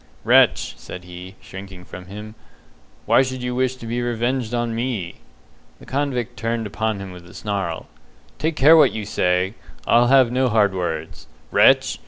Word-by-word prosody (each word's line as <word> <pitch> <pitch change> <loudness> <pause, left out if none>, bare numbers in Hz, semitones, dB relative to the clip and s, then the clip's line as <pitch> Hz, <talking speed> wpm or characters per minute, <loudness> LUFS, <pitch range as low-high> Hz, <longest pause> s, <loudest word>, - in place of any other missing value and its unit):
"Wretch!" - - +4
said 90 - -9
he, 90 +2 -10
shrinking 95 -1 -10
from 90 0 -10
him, 105 +2 -9 0.7
"why - - +5
should 130 -1 -3
you 125 0 -2
wish 130 0 0
to 125 - -11
be 120 +2 -2
revenged 120 0 -1
on 120 -1 -1
me?" 115 -7 -3 0.6
The - - -15
convict 130 -4 -2
turned 115 0 -2
upon 110 0 -2
him 95 -1 -7
with 90 -1 -12
a - - -15
snarl. 95 -6 -3 0.5
"Take 160 +1 -1
care 155 +3 +7
what 150 -5 +5
you 110 -2 -4
say! 90 -1 0 0.3
I'll 120 +1 +4
have 130 -2 +5
no 130 0 +1
hard 105 -3 +3
words. 80 -4 -4 0.2
Wretch! - - +4
110 Hz, 170 wpm, -21 LUFS, 95-125 Hz, 0.7 s, care